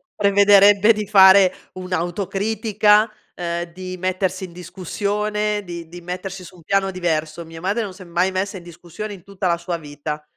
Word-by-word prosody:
prevederebbe 200 +1 +5
di 210 -1 -4
fare 190 -2 +7 0.2
un'autocritica, 200 +4 +1 0.2
ehm, 170 0 -3
di 185 0 -7
mettersi 185 +1 -2
in 175 - -13
discussione, 205 +4 -2
di 170 -3 -8
di 175 +1 -10
mettersi 185 +2 -6
su 180 - -13
un - - -16
piano 195 +3 0
diverso. 165 -3 -2
Mia 165 0 -11
madre 200 +6 -1
non 200 -3 -5
s'è 185 0 -12
mai 175 +2 0
messa 190 +1 -3
in 175 - -11
discussione 175 +5 -8
in 185 -4 -12
tutta 195 0 -4
la 170 -1 +1
sua 170 0 -4
vita. 150 0 -7
185 Hz, 170 wpm, -21 LUFS, 175-200 Hz, 0.2 s, fare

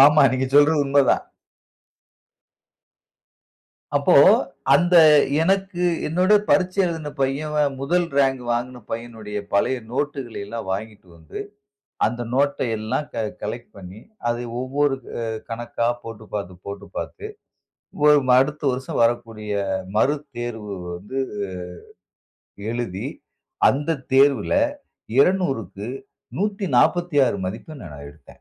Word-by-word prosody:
ஆமா 150 +1 +6
நீங்க 130 0 0
சொல்றது 145 +1 +5
உண்ம 140 +1 +4
தான். - - +2 2.7
அப்போ, - - +3 0.6
அந்த 175 +5 +3 0.5
எனக்கு 190 0 0 0.2
என்னுடைய 185 +6 +4
பரீட்சை 185 +1 +2
எழுதிய 160 -3 -4
பையன் 145 +1 0
முதல் 175 +6 +1
ரேங்க் 135 -2 +2
வாங்கின 120 +1 -2
பையனுடைய 115 -3 -5
பழைய 100 +6 +2 0.2
நோட்டுகளை 135 -5 -3
எல்லாம் 115 -1 -6
வாங்கிட்டு 105 0 -6
வந்து 80 - -9 0.7
அந்த 120 +2 -3
நோட்ட 140 +1 +2 0.2
எல்லாம் 125 +7 -2
க 110 - -1 0.2
கலெக்ட் 120 +3 -5
பண்ணி, 95 +2 -10 0.3
அதை 120 +1 -1 0.2
ஒவ்வொரு 140 +2 +1 0.3
அ - - -3 0.3
கணக்கா 115 0 -2 0.2
போட்டு 115 -1 -9
பார்த்து, 95 -3 -4
போட்டு 100 0 -7
பார்த்து 425 0 -5 0.8
ஒ - - +8 0.3
அடுத்த 150 +3 0
வருஷம் 130 +1 -3
வரக்கூடிய 115 -2 -1 0.4
மறு 145 +7 +3 0.2
தேர்வு 110 -4 -5 0.2
வந்து 105 +9 -5 1.5
எழுதி 115 -6 -3 0.6
அந்த 145 +2 0 0.2
தேர்வில 140 +1 +4 0.7
200க்கு 135 - +1 0.5
146 175 - +2
மதிப்பெண் 120 +8 -7
நான் 75 -3 -10
எடுத்தேன். 75 +2 -18
130 Hz, 105 wpm, -22 LUFS, 110-150 Hz, 2.7 s, ஒ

